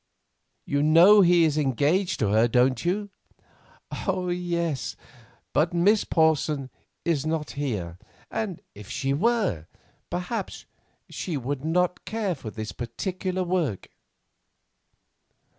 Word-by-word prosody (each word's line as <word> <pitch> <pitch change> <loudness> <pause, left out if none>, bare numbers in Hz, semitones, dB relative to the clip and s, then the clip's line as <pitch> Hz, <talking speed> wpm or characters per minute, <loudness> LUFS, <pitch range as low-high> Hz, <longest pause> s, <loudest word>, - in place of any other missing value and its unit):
You 140 0 0
know 170 +7 +7
he 175 -2 +5
is 155 -1 +2
engaged 150 - +1
to 105 - +2
her, 110 +3 +4
don't 125 +2 +2
you?" 200 +4 -1 1.0
"Yes, 175 -5 -1 0.6
but 165 +3 +2
Miss 200 +5 +3
Porson 155 -4 +1 0.3
is 160 -5 +1
not 155 -1 -2
here; 105 -12 -4 0.3
and 205 -6 -3
if 105 -1 -12
she 135 0 -1
were, 190 - 0 0.4
perhaps 180 +4 -4 0.4
she 170 -5 -4
would 135 +1 -4
not 180 +3 0
care 215 -4 -1
for 130 -8 -8
this 110 0 -6
particular 185 - -3
work." 170 - -1
160 Hz, 110 wpm, -26 LUFS, 135-180 Hz, 1.0 s, know